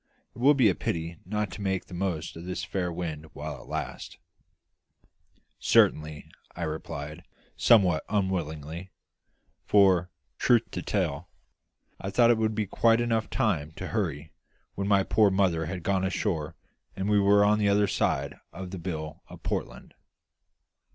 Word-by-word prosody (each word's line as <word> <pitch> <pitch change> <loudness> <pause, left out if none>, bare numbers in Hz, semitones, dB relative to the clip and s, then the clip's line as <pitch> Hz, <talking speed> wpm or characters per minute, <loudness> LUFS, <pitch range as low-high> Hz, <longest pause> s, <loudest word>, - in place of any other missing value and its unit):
It - - -13
will 140 +4 +6
be 130 -5 +5
a 95 - +4
pity 85 +1 -3
not 105 -1 -2
to - - -8
make 95 -2 -1
the - - -13
most 90 -3 -3
of 80 - -8
this 90 0 -4
fair 90 0 -2
wind 80 -3 -5
while - - -6
it - - -15
lasts." - - -5 1.4
"Certainly," 75 -1 +2 0.3
I - - -4
replied, 80 0 -5 0.3
somewhat 95 -9 +4
unwillingly; 85 -4 -2 0.7
for, 95 -3 +4 0.3
truth 120 -2 +4
to - - -4
tell, 85 -5 -2 0.7
I 95 - -4
thought 120 +4 +5
it 115 - +2
would 110 -1 0
be 110 -1 0
quite 115 +3 +3
time 120 - +1
enough 115 -2 0
to 90 - -1
hurry 80 -8 -2 0.4
when 100 0 -3
my 100 -1 +4
poor 105 +1 +4
mother 90 -5 +1
had 90 0 -5
gone 95 0 +1
ashore 85 -5 -1 0.4
and 95 +1 -2
we 105 -1 +4
were 100 +1 +5
on 105 +1 +3
the 105 -1 +3
other 100 +1 +4
side 70 -6 -1
of 90 0 -8
the 95 - -6
Bill 80 -3 -5
of - - -13
Portland. - - -4
95 Hz, 160 wpm, -28 LUFS, 80-105 Hz, 1.4 s, will